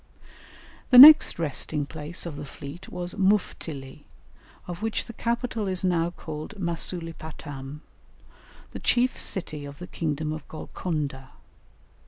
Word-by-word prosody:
The 250 - +6
next 300 +4 +10
resting 150 -1 -1
place 155 +4 -6
of 165 -4 -6
the 145 - -7
fleet 145 +4 -10
was 175 0 -5
Muftili, 160 -8 -1 0.6
of 175 +1 -7
which 225 0 -2
the 230 - -9
capital 235 -2 -2
is 185 -1 -2
now 170 -2 +1
called 160 +2 -8
Masulipatam, 160 -5 -5 0.9
the - - -7
chief 250 +1 +1
city 155 -6 -2
of 140 0 -9
the 180 - -8
kingdom 155 -3 -3
of 155 -2 -8
Golconda. 150 -5 -5
165 Hz, 125 wpm, -26 LUFS, 150-190 Hz, 0.9 s, next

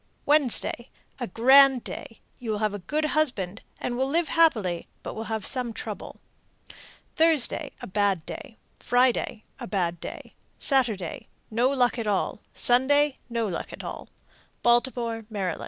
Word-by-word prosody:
Wednesday 270 -4 +1 0.3
a 245 - -2
grand 265 +4 +6
day; 225 - -8 0.2
you 240 - -6
will 215 - 0
have 210 -1 0
a 205 - -4
good 300 - -1
husband, 245 -11 0 0.2
and 240 - -2
will 260 +2 0
live 325 +4 0
happily, 220 - +2 0.2
but - - -5
will 220 - -5
have 220 -1 -3
some 250 -3 0
trouble. - - -7 1.0
Thursday 315 -2 +2
a - - -5
bad 195 -4 0
day. 225 - -8 0.2
Friday 245 -3 +1 0.2
a - - -6
bad 175 -3 -1
day. - - -8 0.2
Saturday 225 - 0 0.2
no 240 +4 +3
luck 250 -3 +2
at 225 - -3
all. 205 0 0 0.2
Sunday 275 +3 +3
no 235 -1 -1
luck 185 -5 -4
at - - -8
all. - - -7 0.6
_Baltimore, 235 -2 +1
Md. 195 -6 -3
240 Hz, 150 wpm, -26 LUFS, 210-270 Hz, 1.0 s, grand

